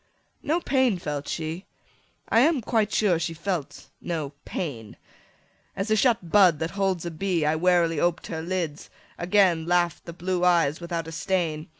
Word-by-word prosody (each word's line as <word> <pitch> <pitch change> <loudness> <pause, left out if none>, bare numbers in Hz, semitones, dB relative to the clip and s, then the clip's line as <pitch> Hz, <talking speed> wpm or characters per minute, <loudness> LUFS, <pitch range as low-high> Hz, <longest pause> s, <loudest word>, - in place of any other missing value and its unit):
No 315 +4 0
pain 260 - +1
felt 145 -4 -5
she; 160 +3 -4 0.6
I 225 - +3
am 290 +1 +3
quite 220 -2 0
sure 185 -6 +2
she 165 0 -3
felt 170 -3 -4
no 155 -5 -4
pain. 120 - -5 0.8
As 195 +3 -3
a - - +5
shut 210 -6 +1
bud 185 -6 +6
that 160 +2 -3
holds 190 -3 -1
a 170 - -3
bee, 170 -1 -1
I 155 +1 +2
warily 170 -1 +2
oped 175 +1 0
her 160 -2 -5
lids: 170 -3 -3 0.3
again 175 -3 +3
Laugh'd 175 -1 +1
the 170 - -7
blue 180 +1 -2
eyes 170 -3 +3
without 170 -1 -4
a - - -7
stain. 165 -3 -2
175 Hz, 170 wpm, -25 LUFS, 160-195 Hz, 0.8 s, bud